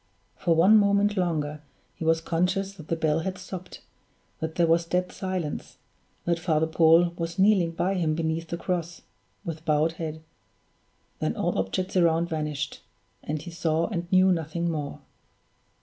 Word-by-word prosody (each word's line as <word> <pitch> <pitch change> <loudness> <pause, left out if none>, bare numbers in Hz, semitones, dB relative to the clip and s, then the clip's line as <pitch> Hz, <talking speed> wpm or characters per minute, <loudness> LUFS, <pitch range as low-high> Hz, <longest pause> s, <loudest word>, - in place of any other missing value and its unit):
For 170 -3 +1
one 195 +7 +7
moment 200 0 +3
longer 155 -5 -1 0.3
he - - -7
was 160 0 +2
conscious 180 +4 0
that 160 -6 -12
the 165 - 0
bell 160 -1 +1
had 185 +3 -3
stopped, 185 -1 -8 0.6
that 160 0 -4
there 170 - +3
was 165 +1 +3
dead 180 +2 -1
silence, 185 -6 -4 0.5
that 170 -1 +1
Father 160 -2 +1
Paul 165 +2 +4
was 170 0 -3
kneeling 190 -4 +4
by 185 +3 0
him 165 -5 0
beneath 165 0 -2
the 170 - -4
cross, 170 -1 -3 0.4
with 165 -1 -5
bowed 155 0 +2
head 160 -1 -6 1.0
then - - -1
all - - -1
objects 95 - -2
around 170 -1 +3
vanished; 150 -3 -3 0.4
and 150 0 -4
he 175 - -8
saw 165 -1 0
and 175 -4 -4
knew 185 0 +5
nothing 170 0 -1
more. 150 -3 -4
165 Hz, 160 wpm, -26 LUFS, 160-180 Hz, 1.0 s, one